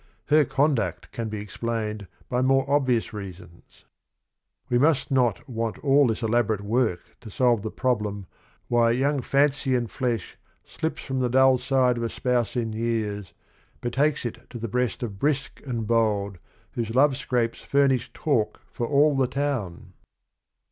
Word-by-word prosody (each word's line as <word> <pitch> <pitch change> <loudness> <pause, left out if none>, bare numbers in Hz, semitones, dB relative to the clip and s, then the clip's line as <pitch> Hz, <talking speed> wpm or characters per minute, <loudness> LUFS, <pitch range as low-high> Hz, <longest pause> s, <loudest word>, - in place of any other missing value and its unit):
Her 150 0 +5
conduct 135 -2 0
can 115 -2 -4
be 105 -1 -4
explained 105 0 -4 0.2
by 125 0 0
more 135 +1 +3
obvious 130 -6 +1
reasons: 90 -4 -11 0.8
f'We 120 - +2
must 150 +1 +2
not 125 -2 +1
want 115 -3 -3
all 140 -1 +5
this 115 +1 -2
elaborate 110 -2 +1
work 110 -2 0 0.2
To 115 - -11
solve 120 0 +2
the 110 - -4
problem 105 -6 -1 0.4
why 120 -1 +3
young 140 +3 +1
Fancy 140 0 +2
and 120 -2 -1
flesh 120 -7 -2 0.3
Slips 160 0 -4
from 135 -1 -3
the 125 -1 +1
dull 130 +1 +5
side 125 -1 +2
of 120 - -2
a 115 - -1
spouse 125 -3 -1
in 115 -3 -1
years, 110 -4 -2 0.5
Betakes 140 +4 0
it 120 +1 -6
to 120 - -7
the 115 0 -4
breast 125 +2 -1
of 100 -5 -5
Brisk 145 +1 -1
and 115 -3 -2
bold 105 -4 +1 0.3
Whose 115 -1 -4
love 140 +1 +5
scrapes 125 -4 -1
furnish 140 -3 +1
talk 110 -8 0
for 120 - -3
all 145 +2 +4
the 135 -1 +2
town 120 -12 -3
120 Hz, 155 wpm, -25 LUFS, 110-135 Hz, 0.8 s, Her